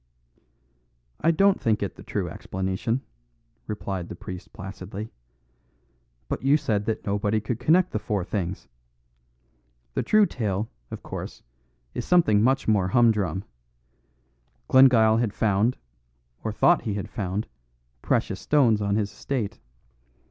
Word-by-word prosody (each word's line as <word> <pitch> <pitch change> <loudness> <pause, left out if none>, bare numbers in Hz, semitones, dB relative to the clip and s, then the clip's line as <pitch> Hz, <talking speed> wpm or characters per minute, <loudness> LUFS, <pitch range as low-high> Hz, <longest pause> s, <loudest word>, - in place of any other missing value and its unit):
"I 165 - +2
don't 195 +4 +3
think 110 -2 +1
it 100 - -3
the - - -12
true - - -3
explanation," 95 +6 -2 0.7
replied 95 -4 -4
the - - -6
priest 90 +1 -9
placidly; 100 +1 -7 1.2
"but - - -3
you 140 +3 +4
said 110 -9 -1
that 110 - -2
nobody 105 +1 +1
could 110 +2 -3
connect 165 +8 +3
the 105 - -1
four 105 -2 -2
things. 95 -3 -4 1.3
The - - 0
true 215 -1 +4
tale, 105 - -2 0.2
of - - -8
course, - - -7 0.5
is - - -3
something 160 -13 +4
much 130 +4 +2
more 100 -4 +3
humdrum. 105 -4 +2 1.2
Glengyle 120 -4 +6
had 115 -3 0
found, 110 +3 +2 0.7
or 110 - -1
thought 175 +10 +4
he 105 -4 -3
had 100 - -4
found, 100 +1 -3 0.6
precious - - 0
stones 120 -8 +3
on 100 0 0
his 105 -2 0
estate. 110 0 -3
110 Hz, 130 wpm, -25 LUFS, 100-125 Hz, 1.3 s, Glengyle